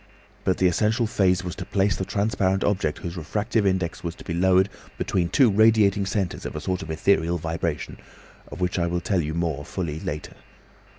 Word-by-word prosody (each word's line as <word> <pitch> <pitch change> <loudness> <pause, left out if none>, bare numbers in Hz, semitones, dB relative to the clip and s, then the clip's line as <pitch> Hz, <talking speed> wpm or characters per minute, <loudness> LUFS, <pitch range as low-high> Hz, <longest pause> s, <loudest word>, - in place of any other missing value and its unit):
But 95 - +2
the 95 - +2
essential 110 +7 +2
phase 95 -4 +2
was 90 -1 -5
to 95 - -4
place 95 0 +1
the 95 - -3
transparent 95 -2 0
object 95 -7 0
whose 85 0 -6
refractive 105 +6 0
index 95 -3 -1
was 85 -1 -4
to - - -12
be 85 - -4
lowered 95 +2 +4 0.3
between 90 -3 0
two 130 -1 +4
radiating 105 -2 +4
centres 95 -3 -2
of - - -6
a - - -2
sort 90 +4 -2
of 80 - -8
ethereal 85 +1 +2
vibration, 80 -1 -3 0.5
of - - -9
which 90 0 0
I 85 - +1
will 85 0 -1
tell 95 -5 +1
you 80 0 -3
more 80 -4 -1
fully 80 -1 -4
later. 75 -1 -5
90 Hz, 195 wpm, -24 LUFS, 85-100 Hz, 0.5 s, lowered